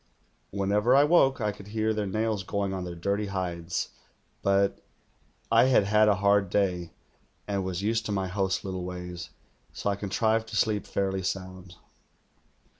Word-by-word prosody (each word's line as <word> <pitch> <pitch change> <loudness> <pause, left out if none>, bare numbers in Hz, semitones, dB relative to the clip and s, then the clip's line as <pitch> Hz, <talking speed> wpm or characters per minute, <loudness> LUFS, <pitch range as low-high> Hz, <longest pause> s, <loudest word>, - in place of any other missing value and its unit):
Whenever 105 +5 +2
I 140 - +7
woke 145 -4 +4
I 105 -2 0
could 100 -1 -12
hear 110 +1 0
their 105 -1 -2
nails 110 +1 -1
going 100 +1 -2
on 95 -1 -3
their 90 -1 -6
dirty 100 +4 -1
hides; 90 -3 -3 0.5
but 100 0 +2 0.7
I - - +6
had 130 -5 +4
had 105 +2 +4
a 105 - +4
hard 100 0 +3
day 90 -4 0 0.6
and 100 -2 -1
was 95 0 -3
used 115 +1 0
to - - -3
my 95 -2 -1
hosts' 95 0 -1
little 95 -2 -4
ways, 90 -2 -6 0.4
so 100 - -1
I - - -1
contrived 110 +3 0
to 110 - -7
sleep 105 -1 +1
fairly 95 -1 -1
sound. 95 -1 -5
100 Hz, 165 wpm, -28 LUFS, 95-105 Hz, 0.7 s, I